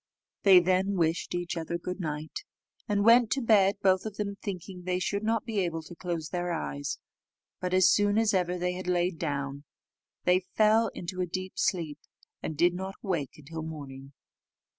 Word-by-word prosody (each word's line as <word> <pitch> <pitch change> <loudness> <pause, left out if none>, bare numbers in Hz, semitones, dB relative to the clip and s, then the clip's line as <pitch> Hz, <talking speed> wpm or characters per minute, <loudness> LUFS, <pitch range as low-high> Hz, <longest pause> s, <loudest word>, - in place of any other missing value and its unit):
They 190 -3 +8
then 185 +3 +1
wished 165 +1 0
each 175 0 -2
other 165 +1 -3
good 180 +2 -5
night, 155 -2 -4 0.5
and 205 -2 +1
went 235 0 +7
to 275 - -1
bed, 200 -3 +5
both 190 -1 +4
of 210 - -8
them 200 -1 -2
thinking 185 -2 -6
they 180 0 -1
should 200 +2 -1
not 225 +1 0
be 220 -3 -1
able 165 -3 -1
to 165 - -11
close 170 -3 -4
their 175 -1 -2
eyes; 70 - -3 0.6
but 180 0 -2
as 185 0 +5
soon 205 0 +3
as 225 -2 +3
ever 180 -1 +1
they 180 0 -1
had 185 0 -6
lain 180 -1 +1
down, 140 -3 -3 0.6
they 180 +1 +4 0.2
fell 220 +1 +5
into 185 +1 -4
a 180 - 0
deep 185 +2 -4
sleep, 160 -5 -1 0.4
and 155 - -4
did 175 +2 +4
not 190 +2 -5
awake 165 -9 -2
till 160 +2 -6
morning. 140 -3 -8
180 Hz, 185 wpm, -29 LUFS, 165-195 Hz, 0.6 s, They